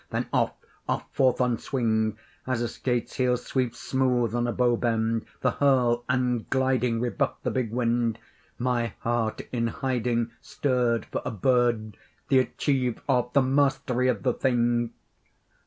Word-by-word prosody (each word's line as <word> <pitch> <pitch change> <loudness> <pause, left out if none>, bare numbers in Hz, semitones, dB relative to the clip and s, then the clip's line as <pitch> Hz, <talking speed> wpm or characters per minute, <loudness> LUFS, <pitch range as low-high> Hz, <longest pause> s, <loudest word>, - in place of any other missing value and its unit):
then - - -2
off, - - +2 0.4
off - - 0
forth 130 -2 +3
on 125 -3 +1
swing, 110 -5 0 0.3
As 130 -2 0
a - - 0
skate's 120 0 -2
heel 125 -2 +2
sweeps 125 -1 -2
smooth 125 -4 +1
on 120 0 0
a - - 0
bow 120 0 +2
bend: 115 -1 0
the 125 - +2
hurl 125 -4 +2
and 125 -2 0
gliding 130 -3 +1
Rebuffed 120 0 -1
the - - 0
big 125 -4 -1
wind. 115 -1 +1 0.4
My 120 -2 0
heart 115 -2 -1
in 115 -2 0
hiding 120 -2 -1
Stirred 125 -4 0
for - - -4
a - - -2
bird, 120 -2 +1 0.3
the 135 - +5
achieve 130 -2 0
of, 125 -3 +1
the 140 - +5
mastery 130 -2 +1
of 115 -7 0
the - - +2
thing! 120 -2 +1
120 Hz, 155 wpm, -26 LUFS, 115-130 Hz, 0.4 s, the